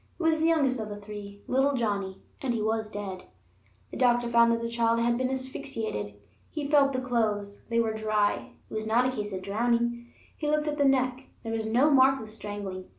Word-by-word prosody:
It - - -3
was 320 -1 +3
the 320 - +3
youngest 280 -6 +2
of 215 -1 -4
the 205 - -5
three, 205 -1 -9
little 270 +2 +2
Johnnie, 200 -5 -2 0.2
and 250 -3 -1
he 225 - -1
was 220 0 0
dead. 195 -3 -6 0.7
The - - -6
doctor 240 -1 +3
found 235 0 +5
that 230 - +1
the 230 - -3
child 230 0 +1
had 235 0 +2
been 255 +1 0
asphyxiated. 260 - -4 0.3
He 300 -3 -4
felt 280 -2 +4
the 255 - 0
clothes; 210 -5 -1
they 230 0 +2
were 225 -1 +1
dry; 215 -1 0
it - - -13
was 215 0 -3
not 235 +3 +3
a 255 - +1
case 210 -2 -3
of 185 -1 -5
drowning. 235 +3 0 0.3
He 300 - -2
looked 300 0 +1
at 295 0 -2
the 285 - +4
neck; 260 -1 +2 0.2
there 225 -1 -4
was 220 -1 -2
no 255 +7 +4
mark 270 0 +5
of 220 -2 -8
strangling. 205 -3 -6
235 Hz, 215 wpm, -28 LUFS, 210-260 Hz, 0.7 s, found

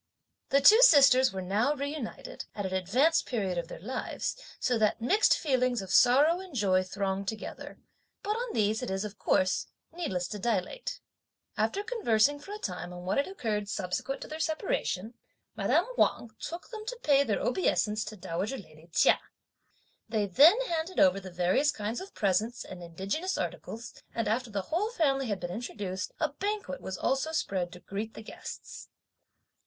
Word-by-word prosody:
The 275 - +4
two 435 - +8
sisters 275 - +7
were 190 -1 -4
now 215 +10 +1
reunited, 285 -3 -5
at 205 - -3
an 190 - -3
advanced 250 - +2
period 195 -8 -1
of 170 - -5
their - - -8
lives, 250 +7 -3 0.2
so 250 - +1
that 215 -1 +2
mixed 385 - +4
feelings 255 -4 +1
of 190 -1 -6
sorrow 285 - +5
and 370 -6 -10
joy 190 -5 +3
thronged 195 +1 -3
together, 220 +1 -6 0.5
but 415 - -1
on 470 +2 -2
these 215 +1 +1
it 250 - -4
is, 190 +2 -2
of 210 0 -8
course, 185 0 +2 0.3
needless 190 - -2
to 210 - -5
dilate. 235 - -2 0.6
After 405 - 0
conversing 290 - +2
for 345 +8 -11
a 415 - -4
time 180 - -5
on 180 0 -8
what 185 - 0
had 280 - +2
occurred, 215 - -3
subsequent 195 +8 -3
to - - -6
their 310 +1 -7
separation, 310 - -1 0.4
madame - - +2
Wang 235 - +2
took 340 +6 -7
them 435 -2 -6
to - - -4
pay 280 -1 +5
their - - 0
obeisance 215 - +1
to 215 - -8
dowager 190 +8 -3
lady 165 -5 -14
Chia. 180 - +4 0.9
They 215 -2 +1
then 295 - +7
handed 340 -5 -2
over 185 +1 +5
the 190 -1 -9
various 180 +11 +2
kinds 215 - -4
of 390 - -10
presents 210 +5 0
and 185 -1 -9
indigenous 195 - -3
articles, 230 +2 -5 0.2
and 230 - -1
after 235 +3 0
the 200 -2 -3
whole 355 - -1
family 275 - +1
had 205 -3 -2
been 175 - -4
introduced, 190 -4 -4
a 310 - +1
banquet 400 -1 -3
was 190 -1 -5
also 270 - 0
spread 185 - -1
to 180 - -10
greet 210 +4 -5
the 220 - -8
guests. - - -9
225 Hz, 175 wpm, -29 LUFS, 190-305 Hz, 0.9 s, two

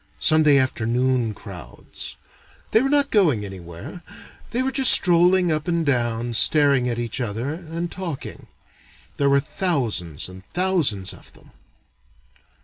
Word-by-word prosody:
Sunday 155 -3 +4
afternoon 125 -2 -1
crowds. 90 - -11 0.6
They 220 - +4
were 270 - 0
not 285 -1 +1
going 155 - +2
anywhere, 95 - -10 0.5
they 245 +2 -1
were 265 - -2
just 265 -1 +5
strolling 180 0 +5
up 155 +1 -2
and 170 -2 -1
down, 120 -3 -1
staring 140 0 +2
at 120 - -3
each 120 +2 -3
other, 120 +5 -4
and 170 +1 -6
talking. 175 -7 -7 0.7
There 140 -1 +1
were 140 0 +3
thousands 135 - -2
and 95 0 -12
thousands 165 - +1
of - - -15
them. - - -21
140 Hz, 135 wpm, -22 LUFS, 115-175 Hz, 0.7 s, just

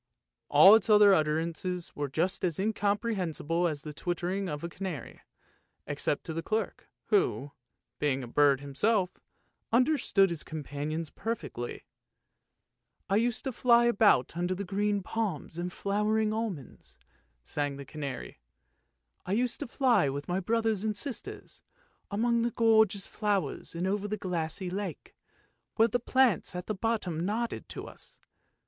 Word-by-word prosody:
" - - -61
All 195 - +9
its 225 +1 +4
other 210 -1 +7
utterances 165 +2 -1
were 145 0 -2
just 170 +9 -1
as 170 -4 0
incomprehensible 195 -5 0
as 150 -3 -4
the 150 - -7
twittering 180 +4 -2
of 150 -1 -4
the 170 - -3
canary, 180 -7 -6 0.6
except - - -1
to 160 - -5
the 165 - -2
clerk, 220 +6 -3 0.2
who, 390 - +1 0.5
being 135 -3 0
a - - -6
bird 140 +1 +3
himself, 180 +8 0 0.5
under 255 +6 +3
stood 195 -2 +3
his 170 - -3
companions 155 +1 -4
perfectly. 205 - -5 0.6
" - - -51
I 200 - +4
used 235 +1 0
to 265 - -2
fly 240 0 +4
about 205 - +3
under 175 +2 -1
green 205 +1 0
palms 180 -7 -3
and 180 +1 -3
flowering 210 +3 0
almonds," 215 - -5 0.5
sang 145 - -2
the 140 - -8
canary. 140 -2 -6 0.4
" 65 0 -47
I 185 - 0
used 245 +3 0
to 290 - -4
fly 245 - +3
with 140 +1 -5
my 180 +2 0
brothers 220 0 0
and 215 -2 -1
sisters, 275 0 -5 0.5
among 235 +3 +1
gorgeous 220 -3 +4
flowers 200 -9 -1
and 170 +2 -2
over 200 +2 -1
the 215 +1 -3
glassy 175 -1 -3
lake, 200 +2 -5 0.6
where 225 +1 +4
the 245 - +1
plants 245 -7 +2
at 180 0 -4
the 215 - -2
bottom 195 -6 -1
nodded 230 +5 -2
to - - -6
us. - - -14
190 Hz, 150 wpm, -29 LUFS, 160-220 Hz, 0.6 s, All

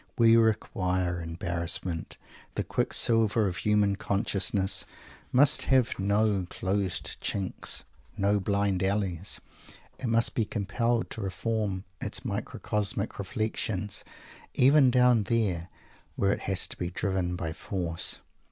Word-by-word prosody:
We 115 -1 +6
require 95 -6 +1
embarrassment. 85 0 -3 0.4
The - - 0
quicksilver 115 -2 +3
of 90 - -3
human 105 -2 +2
consciousness 95 -1 0 0.5
must 140 +2 +5
have 130 -4 +2
no 100 -1 +1
closed 95 -1 -2
chinks, 95 -2 -1 0.3
no 100 +1 +2
blind 100 -1 0
alleys. 95 -2 0 0.6
It 130 - -3
must 115 0 +2
be 115 - +1
compelled 115 +3 -1
to 110 - -5
reform 100 0 -2 0.2
its - - -4
microcosmic 105 0 -2
reflections, 105 -1 -2 0.5
even 135 +1 +6
down 125 -3 +4
there, 95 -6 0 0.5
where 100 0 +2
it - - -4
has 95 -2 +1
to - - -4
be 90 - -2
driven 95 -1 -1
by 80 -2 -3
force. 85 -2 -2
100 Hz, 115 wpm, -28 LUFS, 95-110 Hz, 0.6 s, We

